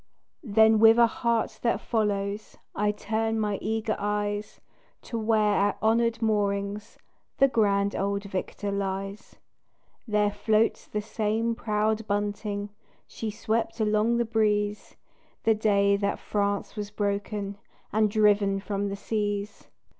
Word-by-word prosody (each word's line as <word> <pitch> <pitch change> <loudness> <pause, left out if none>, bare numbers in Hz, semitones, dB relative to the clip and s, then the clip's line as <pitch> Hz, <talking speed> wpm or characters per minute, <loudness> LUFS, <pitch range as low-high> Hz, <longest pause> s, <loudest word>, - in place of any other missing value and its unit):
Then 220 - +4
with 225 +1 +7
a 235 - +7
heart 230 0 -1
that 235 - +1
follows 205 -1 -2 0.2
I 210 0 +1
turn 220 +1 -1
my 210 -2 -1
eager 220 +1 -1
eyes 205 0 -2 0.4
To 230 - -4
where 215 -1 +2
at 205 0 +1
honored 230 +1 +1
moorings 205 -1 -1 0.4
The 275 - +6
grand 200 -5 +1
old 200 +1 -1
victor 200 +1 -4
lies. 195 +1 -4 0.7
There 210 -1 +2
floats 215 +2 +1
the 210 - -3
same 220 +1 -1
proud 215 -1 -1
bunting 205 0 -2 0.3
She 225 - -5
swept 225 +2 -2
along 215 +2 +2
the 235 - +1
breeze 210 -2 0 0.5
The 225 - +4
day 200 -2 +3
that 200 0 -1
France 200 -1 -2
was 205 -1 -4
broken 205 -1 -3 0.3
And 215 0 +3
driven 205 -2 +3
from 200 0 -3
the 195 - -3
seas. 205 0 -3
210 Hz, 130 wpm, -27 LUFS, 200-220 Hz, 0.7 s, with